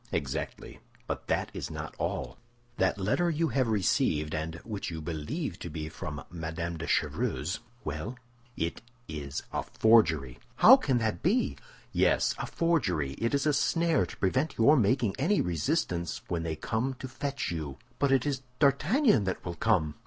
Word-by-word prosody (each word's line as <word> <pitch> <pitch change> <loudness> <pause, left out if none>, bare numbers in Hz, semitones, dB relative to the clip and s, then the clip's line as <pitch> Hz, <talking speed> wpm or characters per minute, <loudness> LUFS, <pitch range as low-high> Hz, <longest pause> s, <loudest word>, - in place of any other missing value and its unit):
"Exactly; 65 -2 -4 0.3
but - - -4
that - - 0
is - - -4
not - - -6
all. - - -3 0.4
That - - +2
letter 135 - +1
you 165 0 +1
have 130 -3 +1
received, 85 -7 +1
and 80 +1 -3
which 105 -3 -4
you 80 -2 -5
believe 85 - -4
to 85 - -6
be 75 0 -5
from 75 -1 -6
Madame 85 0 -4
de - - -5
Chevreuse—" 85 +5 0 0.2
"Well?" 75 - -4 0.4
"It 85 +1 -2 0.3
is 75 -3 -5
a - - 0
forgery." 80 - +3 0.2
"How 255 - +9
can 140 - +1
that 110 -2 -1
be?" 220 +9 +2 0.4
"Yes, - - +3
a - - -3
forgery; 95 - +1
it 115 +4 +1
is 140 - 0
a 150 - +3
snare 165 +2 +2
to - - -10
prevent 130 +10 0
your 140 +7 +6
making 115 -3 +2
any 185 +9 +2
resistance 85 - -1
when 85 -2 -1
they 80 -1 -2
come 115 - -2
to 130 - -7
fetch 140 -4 -3
you." 75 -5 -4 0.2
"But 140 -1 +2
it 135 -1 +3
is 140 -3 -1 0.2
D'Artagnan 150 - +3
that 95 - -3
will 85 - -3
come." 85 -6 +1
105 Hz, 165 wpm, -29 LUFS, -, 0.4 s, How